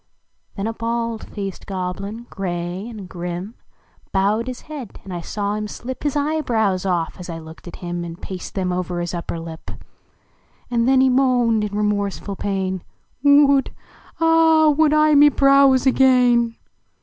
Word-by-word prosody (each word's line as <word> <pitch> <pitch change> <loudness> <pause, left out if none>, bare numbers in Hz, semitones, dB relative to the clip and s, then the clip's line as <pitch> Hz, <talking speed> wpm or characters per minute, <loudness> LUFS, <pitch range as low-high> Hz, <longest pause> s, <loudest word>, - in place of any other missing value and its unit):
Then 195 - -3
a 225 - -2
bald 230 0 -3
faced 195 -3 -6
(loblin, 195 +5 -5
gray 180 +2 -4
and 210 -5 -9
grim, 175 +4 -5 0.6
I 195 +2 +3
owed 230 +3 -2
his 255 -1 -6
head, 290 -8 -9
and 190 - -8
1 175 - -4
saw 205 +3 -3
him 210 0 -3
slip 250 +4 -7
His 290 -1 -1
evebrows 235 -11 0
off, 170 -1 -1
as 180 - -8
I 165 - -5
looked 160 +1 -12
at 175 - -8
him, 175 0 -3
And 170 +1 -8
paste 185 -3 -7
them 185 -2 -1
over 180 -1 -3
his 175 0 -3
upper 170 -1 -4
lip; 165 -1 -9 1.0
And 235 0 +1
then 265 0 +5
he 265 - +4
moaned 250 -4 +2
in 205 0 -3
remorseful 205 -1 -1
pain 190 -2 -2 0.4
Would 285 -1 +4 0.4
Ah, 325 -1 +5
would 300 +1 +3
I 305 0 +4
d - - +5
me 295 +1 +8
brows 275 -2 +4
again!" 250 -3 +4
215 Hz, 165 wpm, -21 LUFS, 185-260 Hz, 1.0 s, me